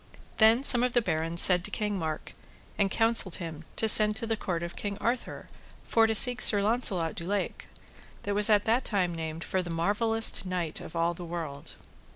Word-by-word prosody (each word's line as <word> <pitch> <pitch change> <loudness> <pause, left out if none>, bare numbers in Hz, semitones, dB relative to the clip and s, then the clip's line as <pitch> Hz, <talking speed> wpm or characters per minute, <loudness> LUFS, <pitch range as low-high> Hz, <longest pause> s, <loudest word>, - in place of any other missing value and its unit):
Then 225 +4 +4
some 245 -3 +3
of 250 -1 -1
the 240 - +2
barons 165 -1 0
said 180 -2 +5
to - - -4
King 210 -3 -4
Mark, 155 -2 -6 0.4
and 200 -2 0
counselled 225 -4 0
him 165 -2 -8
to 220 - 0
send 210 0 +6
to 230 - -5
the 225 0 -2
court 175 -5 -5
of 170 - -8
King 200 -1 -6
Arthur 235 +3 -4 0.4
for 225 -1 +1
to 220 - -2
seek 250 +3 +7
Sir 205 -2 +4
Launcelot 200 -7 0
du - - -8
Lake, 200 0 -4 0.6
that 205 - -3
was 205 0 +3
that 210 -2 +2 0.2
time 185 -5 -2
named 160 0 -7
for 190 - -3
the 175 - -9
marvelloust 210 +7 +1
knight 180 -4 -5
of 165 - -11
all 170 +1 -1
the 175 - -11
world. 165 -4 -7
200 Hz, 195 wpm, -27 LUFS, 170-220 Hz, 0.6 s, seek